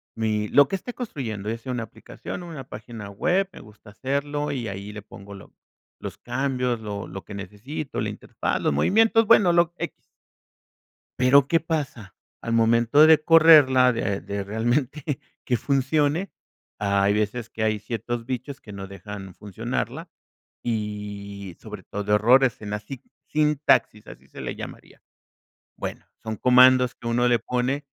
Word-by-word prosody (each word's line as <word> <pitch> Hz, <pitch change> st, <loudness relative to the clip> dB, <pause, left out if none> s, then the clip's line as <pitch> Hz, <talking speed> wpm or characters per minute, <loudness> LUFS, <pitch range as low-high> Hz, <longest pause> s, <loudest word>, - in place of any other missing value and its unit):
mi 110 Hz, -1 st, -1 dB
lo 140 Hz, +4 st, +5 dB
que 195 Hz, -, -1 dB
esté 245 Hz, +6 st, -8 dB
construyendo, 115 Hz, -, -5 dB
ya 115 Hz, -, -2 dB
sea 125 Hz, +2 st, -6 dB
una 120 Hz, -2 st, -2 dB
aplicación 115 Hz, -, -9 dB
o -, -, -9 dB
una 155 Hz, -5 st, -7 dB
página 115 Hz, -5 st, -9 dB
web, 175 Hz, -, 0 dB
me -, -, -12 dB
gusta 105 Hz, 0 st, -16 dB
hacerlo 140 Hz, +6 st, -2 dB
y 120 Hz, -5 st, -3 dB
ahí 100 Hz, +1 st, -7 dB
le 105 Hz, -, -7 dB
pongo 100 Hz, -2 st, -12 dB
lo 100 Hz, -, -13 dB, 0.5 s
los -, -, -7 dB
cambios, 125 Hz, -3 st, -1 dB
lo 105 Hz, -2 st, -5 dB
lo 95 Hz, +1 st, -9 dB
que 105 Hz, -, -10 dB
necesito, 105 Hz, +9 st, -6 dB
la -, -, -1 dB
interfaz, -, -, -3 dB
los -, -, +1 dB
movimientos, 220 Hz, -, +3 dB
bueno, 205 Hz, -5 st, +6 dB
lo 170 Hz, 0 st, +3 dB
X. -, -, -7 dB, 1.1 s
Pero, 135 Hz, +2 st, +5 dB
¿qué 165 Hz, -, +3 dB
pasa? 140 Hz, -, -4 dB, 0.3 s
Al 115 Hz, -, -3 dB
momento 115 Hz, +5 st, +5 dB
de 160 Hz, -1 st, +6 dB
correrla, 150 Hz, -6 st, +7 dB
de 100 Hz, -4 st, -1 dB
de 100 Hz, 0 st, -4 dB
realmente 125 Hz, +7 st, -1 dB, 0.3 s
que 125 Hz, -, +1 dB
funcione, 145 Hz, -, 0 dB, 0.5 s
hay 100 Hz, 0 st, +2 dB
veces 110 Hz, +2 st, -2 dB
que 110 Hz, -, -4 dB
hay 110 Hz, -1 st, +1 dB
ciertos 115 Hz, +2 st, -4 dB
bichos 130 Hz, +3 st, -5 dB
que 105 Hz, -, -12 dB
no 95 Hz, -1 st, -7 dB
dejan 100 Hz, -1 st, -9 dB
funcionarla 100 Hz, 0 st, -4 dB, 0.5 s
y 105 Hz, -4 st, -5 dB
sobre -, -, -9 dB
todo 105 Hz, +1 st, -2 dB
errores 120 Hz, +3 st, +4 dB
en 105 Hz, -, -6 dB
la 105 Hz, -, -2 dB
sit 120 Hz, +4 st, -10 dB, 0.2 s
sintaxis, 150 Hz, -7 st, +2 dB
así -, -, -13 dB
se -, -, -11 dB
le -, -, -4 dB
llamaría. -, -, -10 dB, 0.8 s
Bueno, -, -, -6 dB, 0.2 s
son 110 Hz, -1 st, -4 dB
comandos 125 Hz, 0 st, +5 dB
que 115 Hz, -, -8 dB
uno 120 Hz, +1 st, +2 dB
le 120 Hz, -1 st, +3 dB
pone 125 Hz, +5 st, -2 dB
120 Hz, 160 wpm, -24 LUFS, 105-140 Hz, 1.1 s, correrla